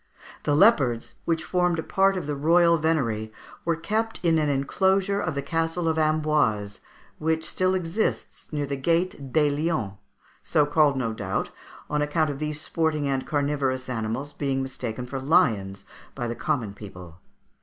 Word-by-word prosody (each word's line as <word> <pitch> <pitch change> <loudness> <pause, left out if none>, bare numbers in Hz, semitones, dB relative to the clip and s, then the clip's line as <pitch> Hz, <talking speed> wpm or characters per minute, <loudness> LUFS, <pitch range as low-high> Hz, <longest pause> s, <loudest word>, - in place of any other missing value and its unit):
The 145 - +2
leopards, 140 - +4
which 165 -1 0
formed 180 -2 +1
a 160 - -2
part 195 +2 +2
of 180 - -4
the 145 0 -2
royal 170 +3 +4
venery, 115 -9 0 0.3
were 170 - +2
kept 220 +7 -2
in 165 -2 +3
an 150 -1 +1
enclosure 190 +8 +1
of 160 - -2
the 140 - -2
Castle 165 +1 -1
of 160 0 +1
Amboise, 150 -10 +1 0.4
which 160 0 0
still 185 +3 +1
exists 180 +4 -2
near 145 -2 -1
the 140 0 -3
gate 165 -2 0
des 150 -1 +3
Lions, 145 - -1 0.5
so 150 - +2
called, 145 -1 +3
no 115 -4 -1
doubt, 95 -3 -3 0.4
on 150 0 -1
account 150 +1 +1
of 140 - -7
these 150 -1 -3
sporting 155 -2 -1
and 135 -1 -1
carnivorous 140 -3 -1
animals 120 +4 -3
being 135 -2 -1
mistaken 125 -2 -5
for 135 +2 -5
lions 100 -9 +2 0.3
by 120 -3 -3
the 115 - -2
common 125 -10 -2
people. 90 -4 -11
150 Hz, 165 wpm, -25 LUFS, 130-165 Hz, 0.5 s, leopards